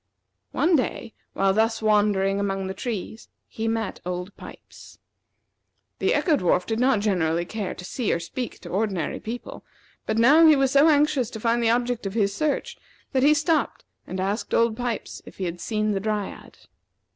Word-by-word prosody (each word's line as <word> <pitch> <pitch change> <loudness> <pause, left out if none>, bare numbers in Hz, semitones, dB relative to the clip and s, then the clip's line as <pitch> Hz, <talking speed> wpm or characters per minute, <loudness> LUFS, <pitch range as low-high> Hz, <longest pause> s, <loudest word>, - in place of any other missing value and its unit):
One 340 +1 +2
day, 240 -4 -2 0.2
while 195 0 +2
thus 225 +2 +1
wandering 205 -2 +2
among 195 -1 -2
the 190 - -4
trees, 220 +1 -6 0.2
he 225 0 -4
met 225 -2 -2
Old 180 +2 -5
Pipes. - - -13 1.0
The - - +2
Echo 325 -5 +2
dwarf 180 -3 +1
did 225 0 -2
not 255 -4 +3
generally 170 -5 0
care 205 +1 -4
to 180 - -9
see 235 +2 -2
or - - 0
speak 240 +9 -5
to - - -9
ordinary 190 -5 -2
people; 235 +3 -7 0.4
but 220 - 0
now 280 +8 +6
he 310 - +7
was 270 -1 +2
so 280 +3 +5
anxious 290 -5 +2
to 225 - -8
find 230 +2 +1
the 230 - +2
object 240 -2 0
of 195 - -6
his 200 -3 +1
search, 310 - -2 0.3
that 260 - +1
he 295 +3 +5
stopped 315 +1 0 0.2
and 185 - -5
asked 200 +4 -2
Old 230 -1 +3
Pipes 245 -1 -4
if - - -13
he 195 - -4
had 175 -1 -4
seen 215 -1 -1
the 200 - 0
Dryad. 210 0 -4
220 Hz, 180 wpm, -24 LUFS, 195-245 Hz, 1.0 s, he